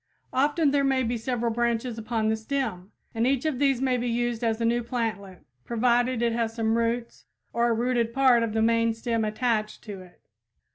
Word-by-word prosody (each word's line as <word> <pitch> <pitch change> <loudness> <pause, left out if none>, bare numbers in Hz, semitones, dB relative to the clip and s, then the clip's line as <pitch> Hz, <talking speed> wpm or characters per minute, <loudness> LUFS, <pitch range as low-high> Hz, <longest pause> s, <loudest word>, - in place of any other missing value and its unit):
Often 290 +3 +2
there 280 0 +2
may 265 -1 +2
be 240 +1 -1
several 235 0 -2
branches 235 0 -1
upon 220 0 -1
the 220 - +2
stem, 220 -5 -3 0.2
and 230 +1 +1
each 270 +1 +1
of 300 -5 -1
these 270 -3 +2
may 255 -1 +2
be 245 0 -2
used 240 0 -1
as 225 -1 0
a 230 - 0
new 240 +1 +2
plantlet 220 -6 -4 0.2
provided 240 +1 +1
it 235 -1 +1
has 230 -1 -1
some 225 -1 +1
roots 235 +1 -2 0.3
or 235 0 +2
a - - +3
rooted 235 0 0
part 255 -2 +4
of 230 -2 -1
the 220 0 +1
main 230 0 +2
stem 230 -1 -1
attached 215 0 -1
to 200 -3 -8
it. 180 -1 -17
235 Hz, 200 wpm, -26 LUFS, 225-250 Hz, 0.3 s, part